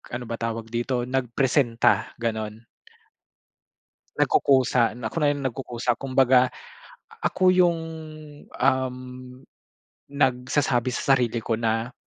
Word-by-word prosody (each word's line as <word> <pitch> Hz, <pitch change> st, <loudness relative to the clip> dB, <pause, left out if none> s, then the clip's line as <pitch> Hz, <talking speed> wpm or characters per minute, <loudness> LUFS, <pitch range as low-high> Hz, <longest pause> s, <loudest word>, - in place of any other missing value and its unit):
ano 125 Hz, -, -5 dB
ba 115 Hz, -, -3 dB
tawag 115 Hz, -1 st, -4 dB
dito, 120 Hz, +1 st, -1 dB
nagpresenta 125 Hz, -1 st, +1 dB
ganon. 110 Hz, -1 st, -4 dB, 1.5 s
Nagkukusa 125 Hz, -4 st, +3 dB
na 110 Hz, -3 st, -5 dB
ako -, -, -13 dB
na 145 Hz, -, +3 dB
yung 140 Hz, -1 st, -6 dB
nagkukusa. 120 Hz, -1 st, -2 dB
Kumbaga, 130 Hz, -1 st, +3 dB, 0.7 s
ako 185 Hz, 0 st, +2 dB
yung 175 Hz, -2 st, +3 dB, 0.8 s
um, 130 Hz, -1 st, +1 dB, 1.1 s
nagsasabi 130 Hz, -2 st, +1 dB
sa 135 Hz, +2 st, +2 dB
sarili 120 Hz, -2 st, 0 dB
ko 115 Hz, 0 st, -2 dB
na, 115 Hz, +2 st, -1 dB
125 Hz, 105 wpm, -24 LUFS, 115-135 Hz, 1.5 s, Nagkukusa